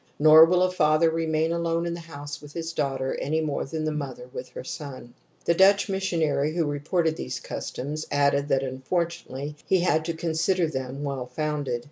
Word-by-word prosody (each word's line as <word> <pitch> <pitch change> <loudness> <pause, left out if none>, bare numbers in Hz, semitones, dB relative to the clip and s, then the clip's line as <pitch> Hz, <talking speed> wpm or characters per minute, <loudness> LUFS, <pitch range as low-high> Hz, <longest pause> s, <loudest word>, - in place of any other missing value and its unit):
Nor 155 +1 +9
will 180 +2 +3
a 185 - +2
father 155 -1 +3
remain 160 0 0
alone 170 0 0
in 170 - -2
the 170 - -5
house 145 -3 -8
with 145 0 -12
his 165 -1 -4
daughter 135 -3 -1
any 155 +3 0
more 155 -3 -1
than 155 +3 -4
the 155 - 0
mother 135 -5 -5
with 130 - -6
her - - -8
son. 130 -4 -8 0.3
The 170 - +4
Dutch 195 +4 +5
missionary 165 -6 0
who 170 -2 +1
reported 155 +3 0
these 65 - -4
customs 150 +4 -5
added 140 0 +2
that 135 -2 +2
unfortunately 145 +1 -3
he 190 -2 +3
had 160 -3 +2
to 170 0 -2
consider 165 +2 +1
them 130 -1 -4
well 135 -3 -3
founded. 145 -2 -2
155 Hz, 185 wpm, -26 LUFS, 140-170 Hz, 0.3 s, Nor